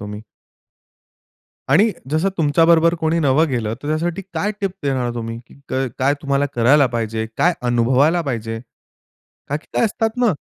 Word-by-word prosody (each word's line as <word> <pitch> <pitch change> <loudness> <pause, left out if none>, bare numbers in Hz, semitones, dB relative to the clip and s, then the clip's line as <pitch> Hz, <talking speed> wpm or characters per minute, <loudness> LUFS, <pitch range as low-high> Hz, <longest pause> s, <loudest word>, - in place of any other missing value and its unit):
तुम्ही. 105 +1 -7 1.5
आणि 195 +12 +4 0.2
जसं 160 +5 +1
तुमच्या 155 +1 +3
बरोबर 170 0 +5
कोणी 160 0 +1
नवं 150 +2 +3
गेलं 115 -4 -2
तर 145 - -5
त्यासाठी 165 +4 -1
काय 200 +6 -1
टिप 195 -1 0
देणार 130 -4 -1
तुम्ही, 115 -1 -5 0.3
क 130 0 0
काय 135 +2 +2
तुम्हाला 140 -1 +1
करायला 130 +4 +4
पाहिजे? 115 -2 -3
काय 175 - +3
अनुभवायला 125 +7 +2
पाहिजे? 115 -5 -4 0.9
का 145 - 0
की 155 - -13
काय - - +2
असतात 225 +1 0
ना 245 -4 +3
140 Hz, 155 wpm, -20 LUFS, 120-165 Hz, 1.5 s, बरोबर